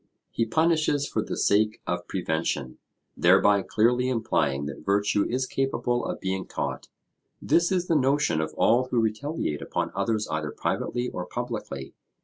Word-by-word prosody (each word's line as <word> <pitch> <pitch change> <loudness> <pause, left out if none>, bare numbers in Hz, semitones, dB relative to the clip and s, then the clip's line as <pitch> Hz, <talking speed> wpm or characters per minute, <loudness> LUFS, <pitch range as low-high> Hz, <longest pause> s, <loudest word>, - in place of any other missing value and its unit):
He 115 - 0
punishes 155 -1 +2
for - - -1
the - - -4
sake 105 +2 +2
of 90 0 -3
prevention, 80 -7 -2 0.4
thereby 100 +3 +5
clearly 120 +6 +2
implying 70 - 0
that 70 +1 -7
virtue 100 +2 +2
is 130 +2 0
capable 125 -2 -1
of - - -4
being 95 0 -3
taught. - - -4 0.5
This 170 +1 +2
is 180 -2 +1
the 165 - +1
notion 135 - +2
of 80 - -3
all 120 +3 +3
who 125 -2 +1
retaliate 110 - -1
upon - - -2
others 110 -2 -1
either 80 -1 -2
privately 125 +9 -2
or 90 -1 -5
publicly. 115 - -5
110 Hz, 150 wpm, -26 LUFS, 90-130 Hz, 0.5 s, thereby